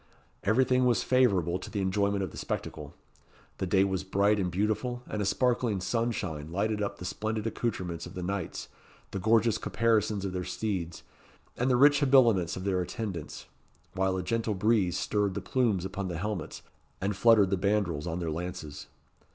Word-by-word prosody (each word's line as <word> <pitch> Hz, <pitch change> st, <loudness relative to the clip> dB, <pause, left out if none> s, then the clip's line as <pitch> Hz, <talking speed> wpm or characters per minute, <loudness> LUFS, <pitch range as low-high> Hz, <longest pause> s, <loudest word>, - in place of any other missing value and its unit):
Everything 125 Hz, +4 st, +3 dB
was 120 Hz, -, +2 dB
favourable 95 Hz, -9 st, +2 dB
to 95 Hz, -, -8 dB
the 105 Hz, -, -3 dB
enjoyment 100 Hz, +1 st, +1 dB
of 90 Hz, -, -4 dB
the -, -, -11 dB
spectacle. -, -, -5 dB, 0.6 s
The 95 Hz, -, -1 dB
day 95 Hz, +1 st, +4 dB
was 95 Hz, -1 st, -1 dB
bright 100 Hz, +2 st, +2 dB
and 90 Hz, -2 st, 0 dB
beautiful, 110 Hz, +7 st, -1 dB
and 105 Hz, -, -3 dB
a -, -, 0 dB
sparkling 120 Hz, -1 st, +1 dB
sunshine 90 Hz, -7 st, -2 dB
lighted 105 Hz, +3 st, -1 dB
up 100 Hz, -, -2 dB
the 90 Hz, -, -8 dB
splendid 110 Hz, +3 st, -3 dB
accoutrements 95 Hz, -8 st, -3 dB
of -, -, -12 dB
the 90 Hz, -, -4 dB
knights, 95 Hz, -1 st, -4 dB, 0.4 s
the 100 Hz, -, -3 dB
gorgeous 110 Hz, +2 st, +3 dB
caparisons 110 Hz, -3 st, +1 dB
of 95 Hz, -, -3 dB
their 90 Hz, -1 st, -2 dB
steeds, 90 Hz, -5 st, -3 dB, 0.5 s
and 125 Hz, +2 st, 0 dB
the 125 Hz, -, +4 dB
rich 145 Hz, +2 st, +6 dB
habiliments 120 Hz, -, +4 dB
of 95 Hz, -, -5 dB
their 95 Hz, -2 st, +1 dB
attendants; 90 Hz, -4 st, -5 dB, 0.5 s
while 95 Hz, 0 st, 0 dB
a 90 Hz, -, -2 dB
gentle 115 Hz, +1 st, -1 dB
breeze 95 Hz, -3 st, +2 dB
stirred 100 Hz, -2 st, 0 dB
the -, -, -1 dB
plumes 115 Hz, -9 st, 0 dB
upon 95 Hz, 0 st, -4 dB
the 85 Hz, -2 st, -4 dB
helmets, 105 Hz, +2 st, -4 dB, 0.4 s
and 100 Hz, +1 st, -1 dB
fluttered 105 Hz, -2 st, +5 dB
the -, -, +3 dB
bandrols 95 Hz, -5 st, 0 dB
on 85 Hz, 0 st, -2 dB
their 85 Hz, -3 st, -2 dB
lances. 85 Hz, -3 st, -6 dB
100 Hz, 175 wpm, -29 LUFS, 90-110 Hz, 0.6 s, rich